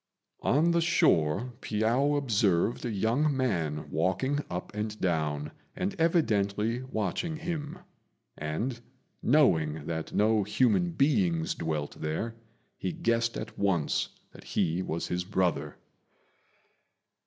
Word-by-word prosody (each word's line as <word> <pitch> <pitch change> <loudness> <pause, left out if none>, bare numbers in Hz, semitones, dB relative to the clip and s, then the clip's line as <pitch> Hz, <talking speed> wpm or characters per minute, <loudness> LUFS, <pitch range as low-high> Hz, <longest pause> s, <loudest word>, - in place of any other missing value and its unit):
On 155 +6 +3
the 170 0 +3
shore 120 - +2
Piao 120 +7 +1
observed 105 -6 +1
a - - -1
young 120 +8 +1
man 80 - -1
walking 115 - +1
up 90 +3 -5
and 105 0 -4
down 75 -4 -1 0.2
and 190 +2 -1
evidently 115 - +2
watching 130 - -2
him; 160 0 -4 0.6
and, 110 +12 -3 0.4
knowing 80 - +3
that 80 0 -4
no 110 +1 +3
human 125 - +2
beings 100 - +2
dwelt 75 -3 -3
there, 80 +9 -2 0.5
he - - -2
guessed 115 -8 0
at - - -7
once 95 -7 +1 0.2
that - - -14
he 85 +3 0
was 85 -2 -3
his 90 0 -1
brother. 90 -6 -1
105 Hz, 115 wpm, -29 LUFS, 85-135 Hz, 0.6 s, On